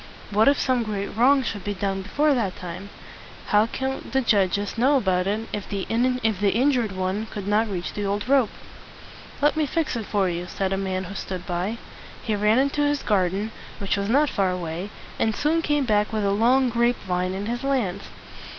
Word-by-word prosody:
What 215 +4 +4
if 280 0 +5
some 255 -2 +1
great 205 -3 -4
wrong 265 +4 +4
should 205 -5 -4
be 205 0 -3
done 195 0 -2
before 290 +10 +1
it 225 -9 0
came? 180 +3 -7 0.6
How 210 +1 +4
could 265 +3 -4
the 265 - +3
judges 205 -3 +1
know 265 +5 +4
about 185 -5 +1
it, 215 +3 -1
if 205 - -4
the 200 -2 -3
in 240 +3 +3
jured 225 +2 +1
one 190 +4 -2
could 205 -2 -6
not 215 +2 +2
reach 180 -3 -4
the 205 - -3
old 205 +3 -2
rope? 265 -4 +4 0.9
"Let 295 - +4
me 310 -1 +1
fix 315 -1 -1
it 225 -3 -4
for 200 -3 +1
you," 175 0 -3
said 190 +2 -2
a - - +2
man 190 -1 -2
who 190 +2 -7
stood 185 -2 -5
by. 185 +4 -2 0.5
He 220 - 0
ran 210 +2 +3
into 280 +2 +1
his 290 -1 +1
garden, 200 +1 0 0.3
which 200 - -1
was 200 0 -2
not 285 +4 +3
far 195 -3 +1
away, 180 +1 -4 0.3
and 220 -1 +1
soon 320 +3 +1
came 295 -3 +1
back 210 -2 +2
with 215 -2 -1
a 200 - +2
long 245 +5 +3
grape 235 +1 +2
vine 180 0 -1
in 200 +1 -4
his 240 +2 -3
hands. 235 -9 -1
210 Hz, 205 wpm, -24 LUFS, 195-250 Hz, 0.9 s, if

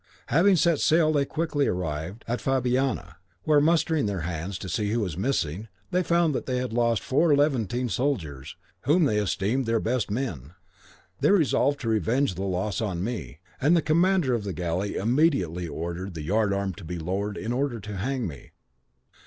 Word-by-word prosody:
Having 185 +6 +5
set 170 -2 +3
sail 155 -1 +3
they 140 -2 +2
quickly 155 -2 -1
arrived 90 +3 -3
at 120 +1 -1
Fabiana, 125 -8 0 0.3
where 150 -2 +4
mustering 160 -3 +2
their 100 -3 -2
hands 85 +3 -4
to 95 - -7
see 105 +4 -1
who 115 +3 0
was 95 -8 -2
missing, 100 - -1 0.2
they 180 - +2
found 170 -3 +2
that - - -3
they 130 -1 0
had 125 -2 -3
lost 115 -3 +1
four 150 +3 +3
Levantine 125 -4 +1
soldiers 95 - -2 0.3
whom 160 +6 +4
they 105 -8 +2
esteemed 105 +5 0
their 115 0 +2
best 120 0 -1
men. 90 - -4 0.6
They - - +3
resolved 145 -6 +3
to 120 - -4
revenge 115 +2 +1
the 90 - -6
loss 95 +3 -1
on 95 -5 -2
me, 90 - -5 0.2
and 155 +6 +4
the - - +3
commander 170 -3 +3
of 115 -3 -1
the 100 -2 -4
galley 90 +3 -2
immediately 105 - +1
ordered 85 +3 -5
the 80 - -5
yard 105 +5 +1
arm 100 -1 -1
to - - -10
be 85 +2 -5
lowered 95 +5 -3
in 115 +2 -3
order 130 -2 -1
to 105 0 -6
hang 130 +4 -2
me. 70 -8 -9
115 Hz, 185 wpm, -26 LUFS, 95-140 Hz, 0.6 s, Having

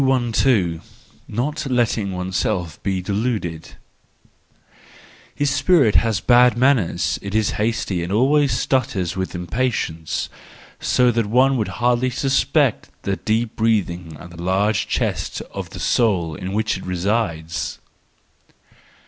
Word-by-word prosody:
212. 120 -9 +2 0.5
Not 140 +6 -2
Letting 115 -5 +1
oneself 90 -2 -2
be 95 -2 -2
Deluded. 100 -6 -3 1.6
—His 145 -1 +1
spirit 145 - +3
has 110 -4 +1
bad 120 +2 +5
manners, 125 -8 +2
it 100 +1 -5
is 110 -1 +2
hasty 105 -5 -1
and 85 - -5
always 135 +6 +3
stutters 110 -7 0
with 95 -1 -3
impatience; 90 -4 -2 0.5
so 125 -1 +3
that 115 -2 0
one 130 +5 +3
would 110 -5 0
hardly 125 +1 +2
suspect 135 +2 +1
the 100 -1 -1
deep 110 +1 -1
breathing 90 -8 -1
and 85 0 -11
the 85 0 -10
large 100 +4 +1
chest - - -2
of - - -6
the - - -9
soul 95 -9 +1
in 90 +5 -6
which 110 0 0
it - - -10
resides. 90 -3 -2
110 Hz, 125 wpm, -21 LUFS, 90-125 Hz, 1.6 s, bad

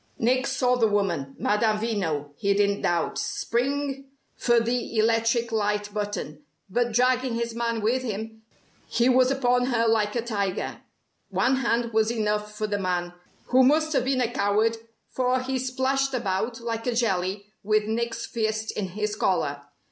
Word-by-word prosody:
Nick 255 +3 +2
saw 255 -2 +2
the 230 -3 +3
woman, 175 -10 -1
Madame 215 +1 +2
Veno, 180 -10 -2
he 200 +6 +1
didn't 200 0 +2
doubt, 170 -2 0
spring 275 +2 -2 0.3
for 240 -1 +3
the 235 0 -2
electric 230 +1 +2
light 210 -1 -1
button, 205 -8 -4 0.3
but 240 +3 +1
dragging 250 +1 +2
his 235 0 -2
man 230 -1 -1
with 235 +5 +1
him, 220 -1 -5 0.5
he 235 +1 +2
was 255 0 +5
upon 250 -2 +2
her 230 -3 +2
like 215 -1 +2
a 235 - 0
tiger. 200 -5 -2 0.5
One 260 +1 +2
hand 235 -2 0
was 220 0 +3
enough 210 -2 -1
for 215 - -1
the 205 -1 -1
man, 175 -2 -1 0.4
who 255 +1 +5
must 310 +4 +3
have 255 - +1
been 260 -1 +1
a 240 -1 0
coward 215 +3 +2 0.3
for 255 0 0
he 260 0 -2
splashed 260 +1 0
about 225 +1 -1
like 230 0 -3
a 245 - 0
jelly 195 -3 0 0.2
with 215 +1 +2
Nick's 230 +2 -2
fist 220 -1 -2
in 200 - -3
his 210 +3 -3
collar. 145 -9 0
225 Hz, 165 wpm, -26 LUFS, 205-250 Hz, 0.5 s, was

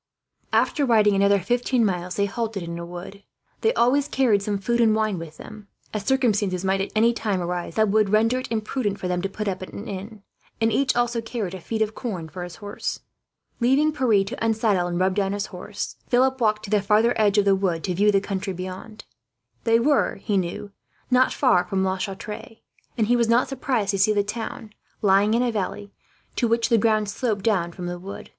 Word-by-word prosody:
After 295 - +2
riding 215 -5 +4
another 200 +1 +4
fifteen 240 +4 +1
miles, 180 -2 -2
they 200 - +1
halted 215 -2 -3
in 170 0 -5
a 170 - -6
wood. 180 +3 -9 0.4
They 445 - +3
always 270 +4 +3
carried 245 -8 +2
some 205 0 -1
food 235 +5 0
and 220 -2 +4
wine 215 -4 0
with 160 -2 -9
them, 215 -1 -11 0.3
as 210 -2 -3
circumstances 205 -8 +1
might 190 0 +1
at 195 - -3
any 230 +2 +4
time 210 -5 -1
arise 175 -1 -3
that 215 -1 +3
would 210 0 +3
render 225 +4 +3
it 255 - -7
imprudent 215 -1 -1
for 185 - -3
them 180 0 -1
to 195 - -2
put 210 +2 -5
up 190 -1 -2
at 185 - -8
an 210 - -7
inn; 200 +2 -7 0.4
and 225 0 +2
each 260 +4 +1
also 240 -1 +1
carried 225 -5 -4
a 190 - -7
feed 220 +4 -1
of 215 0 -4
corn 190 -10 -5
for 180 +4 -8
his 175 -1 -8
horse. 205 -1 -5 0.6
Leaving 275 +6 +3
Pierre 235 -9 +3
to 225 +5 -6
unsaddle 220 -5 +1
and 175 0 -2
rub 185 +1 +2
down 195 0 0
his 205 0 -2
horse, 205 +3 -6
Philip 260 +1 +2
walked 215 -1 +2
to 200 - -7
the 210 -1 +3
farther 215 +4 +3
edge 210 -1 +2
of 205 - +4
the 200 - +5
wood, 185 -4 0
to 185 - -1
view 205 +4 +3
the 200 - +3
country 195 0 -3
beyond. 185 +4 -8 0.6
They 230 0 +4
were, 285 +4 +2
he 205 +1 -3
knew, 190 +2 -2 0.4
not 255 +1 +4
far 240 -10 +3
from 190 -1 -1
La 190 0 0
Chatre; 210 +3 -6 0.4
and 220 - +2
he 240 +3 +3
was 235 -1 +2
not 235 +2 +4
surprised 255 -7 -1
to 195 - -2
see 215 +3 +4
the 205 -1 +2
town, 220 +1 -6 0.3
lying 200 +2 +4
in 240 - +2
a 245 - +1
valley, 205 -1 -4 0.4
to 240 - +2
which 230 +1 +1
the 230 -2 +4
ground 215 -1 +2
sloped 205 -1 -2
down 185 -6 +1
from 180 +1 -7
the 175 0 -4
wood. 195 +3 -9
210 Hz, 220 wpm, -24 LUFS, 195-230 Hz, 0.6 s, the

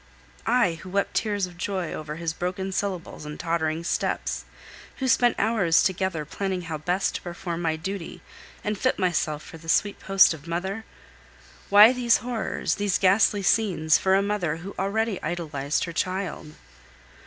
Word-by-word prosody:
I, 205 -9 +2
who 185 - -9
wept 200 +2 0
tears 205 -3 0
of 175 -1 -12
joy 185 -2 -3
over 150 0 -5
his 165 0 -3
broken 185 +3 -3
syllables 185 -5 -3
and 150 0 -7
tottering 165 -1 -1
steps, - - -2 0.5
who 265 - -2
spent 245 0 +4
hours 200 -6 +3
together 185 -4 -1
planning 190 +3 -3
how 160 -2 -5
best 180 +5 0
to - - -4
perform 175 -1 -5
my 160 -2 0
duty, 180 +2 -6 0.4
and 210 -1 -2
fit 255 - +1
myself 160 -5 0
for 165 - -11
the 165 0 -10
sweet 205 +4 +2
post 195 -3 +5
of 160 0 -11
mother? 190 +6 -3 0.8
Why 210 +4 +9
these 245 -2 +3
horrors, 240 -2 -2
these 205 -2 +2
ghastly 200 +1 +3
scenes, 180 -7 +3
for 190 0 +3
a 195 - +3
mother 200 -6 -1
who 185 +4 -8
already 205 +2 -1
idolized 150 -4 -2
her 170 - -4
child? 185 -4 -3
185 Hz, 165 wpm, -25 LUFS, 165-200 Hz, 0.8 s, Why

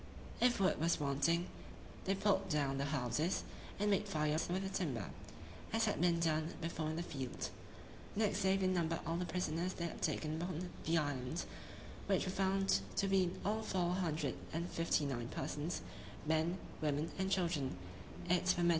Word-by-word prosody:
If 245 -2 +5
wood 190 -1 +3
was 165 +1 +3
wanting, 145 +4 +2 0.6
they 195 - +2
pulled 195 -1 +2
down 140 -4 +1
the 140 - +1
houses, 140 +4 0 0.4
and 205 +1 +3
made 200 +1 +2
fires 155 -3 +1
with 185 +2 0
the 190 - -2
timber, 135 - -2 0.6
as - - +3
had - - 0
been 170 -1 +4
done 160 -1 +1
before 165 -1 -2
in 160 - -2
the 170 - -1
field. 135 -7 -4 0.7
Next 210 0 +2
day 190 0 +4
they 190 - +1
numbered 170 -3 +1
all 165 +1 0
the 180 0 -1
prisoners 180 0 -1
they 170 - -3
had 170 - -5
taken 155 +1 0
upon 180 0 -3
the 165 +1 +3
island, 145 0 -1 0.6
which 195 -2 +3
were 185 - -1
found 195 - +3 0.2
to 195 - +2
be 195 -1 +4
in 175 - -4
all 215 +2 +1
four 180 -4 +1
hundred 160 -7 0 0.2
and 170 +2 -1
fifty 165 -2 +2
nine 120 -4 -2
persons, 150 +6 -3 0.4
men, 160 +3 +2 0.2
women, 150 +1 0
and 190 0 +1
children; 165 - +1 0.5
viz. 180 +1 +3
170 Hz, 170 wpm, -37 LUFS, 150-185 Hz, 0.7 s, If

